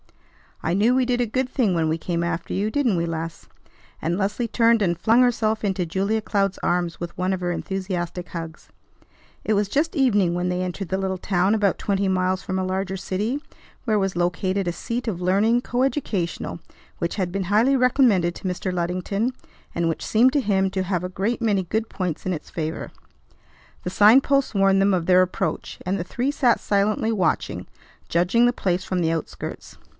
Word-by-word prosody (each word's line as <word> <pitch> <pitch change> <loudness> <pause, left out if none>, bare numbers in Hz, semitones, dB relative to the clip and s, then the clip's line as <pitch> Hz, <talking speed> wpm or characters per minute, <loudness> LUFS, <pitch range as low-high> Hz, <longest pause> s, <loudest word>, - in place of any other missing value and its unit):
I 165 - 0
knew 220 +5 +3
we 255 0 +3
did 245 0 +1
a - - +2
good 255 +3 -1
thing 235 -8 +1
when 165 -2 +1
we 160 - 0
came 170 0 -2
after 170 -1 -3
you. 205 +3 0
Didn't 250 -5 +1
we, 170 0 0
Les?" 165 0 -5 0.5
And 170 +2 -1
Leslie 205 +4 -1
turned 230 0 +3
and 175 -4 +1
flung 225 +7 +4
herself 220 -3 +1
into 190 -3 -1
Julia 200 +6 0
Cloud's 195 -2 0
arms 175 -1 0
with 170 0 -6
one 185 +1 0
of 190 - -2
her 175 -1 -1
enthusiastic 180 -1 -4
hugs. 165 -2 -7 0.7
It 215 - +1
was 205 0 +1
just 310 +6 0
evening 205 - +3
when 180 +1 -1
they 180 0 -1
entered 185 0 -4
the 190 - -1
little 190 -1 -1
town 190 +2 +1
about 205 -3 +1
twenty 200 -1 0
miles 185 0 0
from 190 0 -2
a - - 0
larger 190 +1 -2
city, 215 +10 -2 0.4
where 215 -3 +2
was 195 -2 0
located 185 +2 0
a - - +1
seat 235 +7 -4
of 180 -5 -2
learning, 205 +6 +3
co 245 0 -2
educational, 215 - -2 0.4
which 170 - -2
had 185 -4 -1
been 195 0 -2
highly 220 +8 +3
recommended 245 -9 +3
to - - -5
Mr. 185 +1 -2
Luddington, 185 +7 -1 0.4
and 170 -1 0
which 165 - -3
seemed 245 +4 +4
to 290 - +2
him 195 -4 +1
to 190 -1 -1
have 180 -2 -1
a 180 - -3
great 205 +6 -2
many 205 -4 +2
good 220 +5 -2
points 180 -5 -3
in 185 - 0
its 155 - -7
favor. 160 -1 -4 0.9
The - - -2
sign 215 +7 +7
posts 275 -2 +1
warned 195 -1 +3
them 195 0 +3
of 175 -2 0
their 185 0 +6
approach; 185 - -3
and 190 +2 0
the - - -1
three 245 +9 -1
sat 255 -5 +2
silently 210 +2 +1
watching, 200 -5 -1 0.4
judging 180 +8 +3
the 245 - +3
place 185 -5 -1
from 185 -1 -2
the 165 -1 +1
outskirts. 165 -2 -6
195 Hz, 200 wpm, -23 LUFS, 180-220 Hz, 0.9 s, sign